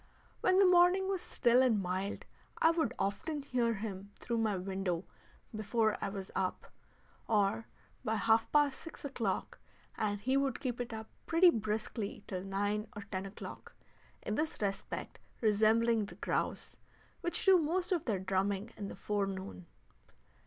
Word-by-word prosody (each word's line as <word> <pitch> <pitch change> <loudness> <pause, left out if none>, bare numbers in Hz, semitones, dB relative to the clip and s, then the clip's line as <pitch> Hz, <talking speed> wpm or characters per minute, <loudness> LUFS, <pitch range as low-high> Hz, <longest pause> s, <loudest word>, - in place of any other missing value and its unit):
When 370 - +3
the 390 - +7
morning 365 +1 +5
was 385 -2 -1
still 240 +2 +3
and 240 -5 +4
mild 190 +2 -3 0.3
I 325 - +6
would 325 -8 +1
often 285 +9 -2
hear 240 -4 +1
him 200 -2 -5
through 235 -1 -2
my 215 -3 +1
window 190 -1 -2 0.5
before 215 0 +1
I - - 0
was 195 -1 -6
up, 185 -1 -2 0.5
or 215 +1 +2 0.4
by 220 - 0
half 225 +1 +3
past 290 -3 +3
six 325 -3 -9
o'clock, 230 -8 -2 0.4
and 205 -1 -1
he 260 +6 +1
would 275 -2 0
keep 245 -2 -2
it 240 - -4
up 220 -1 -6 0.2
pretty 340 +2 +6
briskly 215 -2 -3
till 185 -2 -4
nine 205 +2 -1
or 205 - -6
ten 195 -1 -4
o'clock, 195 - -9 0.5
in 210 - -2
this 310 +7 -1
respect 200 -2 -3 0.2
resembling 220 +1 +3
the - - -10
grouse, - - -2 0.4
which 345 -1 -1
do 380 -2 +7
most 345 +4 0
of 345 -4 +1
their 215 -5 +1
drumming 195 +3 -1
in 205 - -4
the - - -7
forenoon. 190 - -3
220 Hz, 155 wpm, -33 LUFS, 200-265 Hz, 0.5 s, the